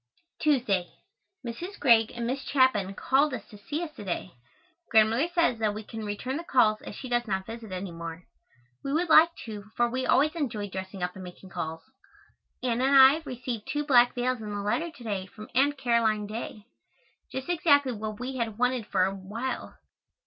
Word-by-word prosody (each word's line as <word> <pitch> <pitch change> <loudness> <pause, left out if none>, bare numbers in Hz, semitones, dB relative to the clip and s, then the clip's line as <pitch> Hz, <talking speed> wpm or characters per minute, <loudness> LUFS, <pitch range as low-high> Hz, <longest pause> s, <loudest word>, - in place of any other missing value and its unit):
Tuesday. 235 - +2 0.6
Mrs. 345 - -6
Greig 230 -5 +5
and 235 0 -3
Miss 260 +3 -2
Chapin 260 -9 +2
called 275 +5 +2
to 215 -4 -8
see 300 +11 -3
us 315 -3 -7
to - - -7
day. 185 -1 -4 0.6
Grandmother 225 +7 +4
says 335 -9 +1
that 215 -2 0
we 215 - -6
can 220 +1 -7
return 250 +7 -3
the 335 - -5
calls 220 -8 +3
as - - -8
she 260 - -7
does 240 -1 0
not 190 -2 -1
visit 225 -1 -8
any 185 0 -4
more. 165 +1 -7 0.6
We 275 - -2
would 335 +2 +1
like 315 +1 +8 0.2
to, 210 -3 -7
for 240 - +4
we 255 +2 -2
always 295 +4 +4
enjoy 230 - -3
dressing 190 0 -6
up 180 0 -2
and 190 - -9
making 180 +1 -11
calls. 160 0 -5 0.8
Anna 250 0 +1
and 275 +1 +4
I 270 +3 +8
received 245 -3 -5
two 295 +2 -1
black 245 -4 +5
veils 250 -1 -1
in 215 - -6
a 205 -1 -3
letter 315 +12 0
to 300 -7 -14
day 200 -4 -3
from 215 +3 -12
Aunt 280 +3 +3
Caroline 230 -4 +1
Dey. 215 0 -6 0.7
Just 265 0 -5
exactly 290 -6 +3
what 215 -2 -5
we 260 +1 -4
had 225 -3 -2
wanted 250 -2 0
for 185 - +2
a 190 - -1
long 190 -1 -10
while. 235 +5 -4
235 Hz, 195 wpm, -28 LUFS, 205-265 Hz, 0.8 s, like